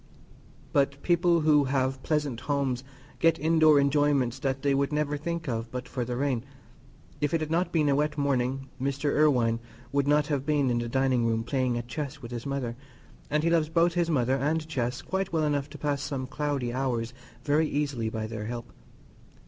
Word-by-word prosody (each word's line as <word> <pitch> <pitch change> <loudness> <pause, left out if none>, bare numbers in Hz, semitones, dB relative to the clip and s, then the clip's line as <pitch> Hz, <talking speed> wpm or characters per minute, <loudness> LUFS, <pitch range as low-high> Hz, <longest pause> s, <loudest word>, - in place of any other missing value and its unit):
But 140 0 +2
people 170 -1 +3
who 150 -2 +4
have 130 0 0
pleasant 145 -6 -1
homes 140 -2 -1 0.4
get 165 -1 +4
indoor 155 -1 +5
enjoyments 140 -3 +2
that 135 0 -2
they 140 -1 +3
would 140 +1 +1
never 150 -1 0
think 165 +2 -4
of 115 -2 -2
but 125 +1 -5
for 125 -2 -3
the 120 +1 -3
rain. 130 -4 0 0.8
If 145 +2 +1
it - - +2
had 155 0 -4
not 175 +3 +1
been 155 -3 +2
a 140 - +3
wet 150 +1 0
morning, 135 -1 0
Mr. 140 +2 0
Irwine 125 -7 +3 0.3
would 140 0 +1
not 150 0 +4
have 145 -3 -1
been 145 -3 +1
in 120 - +1
the 120 0 -3
dining 130 -2 +2
room 115 0 0
playing 130 -1 0
at 120 0 -5
chess 140 +3 -5
with 120 -3 -9
his 120 +2 -5
mother, 135 -4 -2 0.5
and 150 +1 +1
he 165 - +2
loves 160 -2 +2
both 170 +1 +3
his 170 -1 +1
mother 130 -3 +2
and 155 +3 0
chess 125 -5 -2
quite 190 0 -2
well 160 -2 +1
enough 145 -2 0
to - - -10
pass 145 -2 -1
some 140 -3 -3
cloudy 140 -3 -2
hours 125 -3 -1 0.3
very 150 +2 +2
easily 140 -6 -1
by 110 -1 -3
their 110 -1 -5
help. 120 +1 -6
140 Hz, 195 wpm, -28 LUFS, 125-150 Hz, 0.8 s, indoor